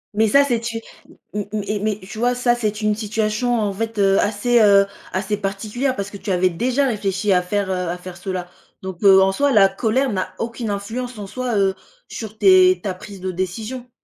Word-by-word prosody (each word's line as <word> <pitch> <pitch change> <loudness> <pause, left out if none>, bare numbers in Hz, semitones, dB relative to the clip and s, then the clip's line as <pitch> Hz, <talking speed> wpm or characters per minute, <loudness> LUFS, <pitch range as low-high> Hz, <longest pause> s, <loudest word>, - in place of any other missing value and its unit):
Mais 220 +1 +3
ça, 280 +7 +5
c'est 245 -5 0
t 230 0 -4 0.5
m 205 -1 -2
m 215 -1 -2
et 210 0 -1
mais 210 0 -1
tu 195 +3 -9
vois? 245 +1 +2
Ça, 245 -1 +2
c'est 215 -2 -2
une 215 0 +2
situation 215 +3 -1
en 205 -2 -1
fait, 225 +2 -4
heu, 195 -1 +4
assez, 220 +4 +2
heu, 200 -2 +6 0.3
assez 190 +2 -2
particulière 210 +7 -2
parce 200 -2 -5
que 200 - -8
tu 200 - -8
avais 185 0 +3
déjà 255 +10 0
réfléchi 200 -4 0
à 180 - +3
faire, 195 +1 -2
heu, - - +1 0.2
à 175 - -3
faire 180 0 -10
cela 180 0 -4 0.4
donc 190 -2 -6
heu, 190 -1 +7
en 190 0 +4
soi, 280 +8 +1
la 195 -3 +6
colère 225 +7 0
n'a 185 -2 -3
aucune 230 0 -4
influence 225 +5 -4
en 205 - -6
soi, 245 +2 -3
heu, 195 -1 +2 0.4
sur 220 -1 -7
tes 370 - +5
ta 195 -3 -2
prise 190 +1 -11
de 185 0 -2
décision. 215 +8 -5
210 Hz, 220 wpm, -21 LUFS, 195-235 Hz, 0.5 s, heu